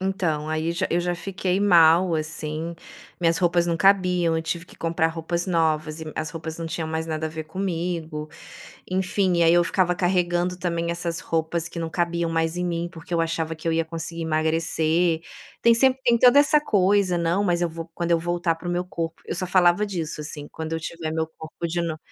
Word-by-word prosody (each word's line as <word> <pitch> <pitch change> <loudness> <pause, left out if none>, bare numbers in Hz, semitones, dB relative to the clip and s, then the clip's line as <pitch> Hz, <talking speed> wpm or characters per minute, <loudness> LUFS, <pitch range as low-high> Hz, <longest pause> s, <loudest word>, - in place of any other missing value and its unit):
Então, 180 -6 -1
aí 155 +1 -1
já 175 +3 -1
eu 175 - +2
já 175 0 -1
fiquei 185 +1 -2
mal, 175 -2 +5
assim. 155 +1 -4 0.5
Minhas 165 -1 +3
roupas 175 -1 +2
não 170 -1 0
cabiam, 180 -3 +3
eu 160 - -1
tive 170 +1 -3
que - - -17
comprar 165 0 0
roupas 170 +1 -3
novas 160 -3 0
e - - -5
as 155 -1 -3
roupas 160 0 -6
não 165 - -5
tinham 160 0 -3
mais 160 0 -2
nada 160 0 -2
a - - -3
ver 160 0 -6
comigo, 165 -3 -3 0.6
enfim. 185 -1 +1
E - - +4
aí, 165 0 +5
eu 175 0 +4
ficava 180 0 +1
carregando 180 0 0
também 170 -1 -1
essas 170 -1 -2
roupas 165 0 -1
que 170 - -7
não 165 - -2
cabiam 170 0 -1
mais 165 +1 0
em 180 - -1
mim, 170 0 -2
porque 165 +1 -7
eu 165 - +2
achava 165 -1 -2
que 160 +1 -11
eu 165 - +2
ia 165 0 0
conseguir 165 0 -5
emagrecer. 160 +1 +1 0.4
Tem 235 - +6
sempre, 260 +3 +4
tem 235 -1 +4
toda 250 +3 +7
essa 300 +1 +5
coisa: 200 -7 +2
"Não, 170 +3 +1
mas 175 -3 +1
eu 170 - +2
vou, 165 +1 -8
quando 170 -1 -2
eu 170 - +4
voltar 175 0 0
para 175 +2 -8
o - - 0
meu 175 +1 -1
corpo", 165 -2 -5
eu - - -3
só 185 +1 -1
falava 180 +2 +4
disso, 170 -6 -4
assim: 150 -1 -6
"Quando 160 0 -6
eu 160 - -2
tiver 160 -1 -5
meu 160 0 -1
corpo 160 +2 -6
de 170 +1 -2
no". 165 -2 -3
170 Hz, 215 wpm, -24 LUFS, 160-180 Hz, 0.6 s, toda